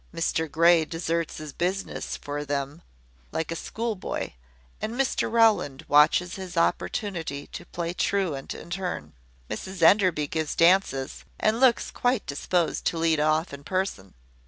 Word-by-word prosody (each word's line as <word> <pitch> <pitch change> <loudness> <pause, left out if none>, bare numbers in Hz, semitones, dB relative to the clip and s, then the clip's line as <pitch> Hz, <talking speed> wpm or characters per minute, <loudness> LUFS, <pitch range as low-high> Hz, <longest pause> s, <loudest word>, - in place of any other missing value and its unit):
Mr 160 -1 -1
Grey 170 0 +5
deserts 165 0 -2
his 155 -2 -7
business 185 +3 -2
for 145 0 -4
them, 145 +2 -3 0.5
like 160 0 -2
a - - -2
school 225 +6 -3
boy; 185 - -4 0.5
and 220 - -3
Mr 265 -3 0
Rowland 220 -12 +3
watches 155 +5 +4
his 185 -2 -7
opportunity 165 -4 -1
to 175 - -9
play 170 0 -3
truant 180 -8 -1
in 170 - -11
turn. 175 - -4 0.3
Mrs 190 -2 -5
Enderby 180 -4 +5
gives 155 +1 -2
dances, 165 -6 +2 0.2
and 220 +2 +2
looks 255 -2 +3
quite 245 -3 0
disposed 165 +4 -1
to 170 - 0
lead 165 -1 +2
off 155 +1 +1
in 140 0 -8
person. 185 - -3
170 Hz, 145 wpm, -26 LUFS, 150-190 Hz, 0.5 s, Grey